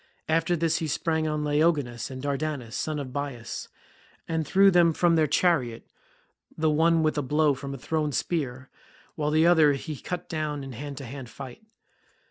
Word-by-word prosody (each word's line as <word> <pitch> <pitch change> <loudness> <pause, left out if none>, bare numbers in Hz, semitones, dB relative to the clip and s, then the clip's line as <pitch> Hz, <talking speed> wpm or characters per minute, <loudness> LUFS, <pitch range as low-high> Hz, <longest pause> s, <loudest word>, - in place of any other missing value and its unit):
After 165 +2 +2
this 165 0 +1
he 160 - -2
sprang 160 +1 0
on 150 -1 -1
Laogonus 145 -5 +1
and 130 0 -7
Dardanus, 140 -4 -3
sons 155 +2 -2
of 130 -3 -6
Bias, 135 -5 -5 0.6
and 160 -2 -1
threw 195 0 +5
them 170 -2 +5
from 170 +1 +3
their 155 -1 +3
chariot, 140 -7 +1 0.7
the 160 -1 +2
one 165 +1 +3
with 155 -1 +1
a - - +1
blow 150 +2 +2
from 140 +1 -6
a - - -7
thrown 150 +3 -1
spear, 130 -5 -2 0.4
while 150 -1 -1
the 155 +2 +3
other 160 -4 +6
he 150 +3 -5
cut 175 +5 -5
down 150 -3 -3
in 135 - -7
hand 140 +3 -7
to 135 - -6
hand 130 0 -8
fight. 130 0 -9
150 Hz, 180 wpm, -27 LUFS, 135-160 Hz, 0.7 s, other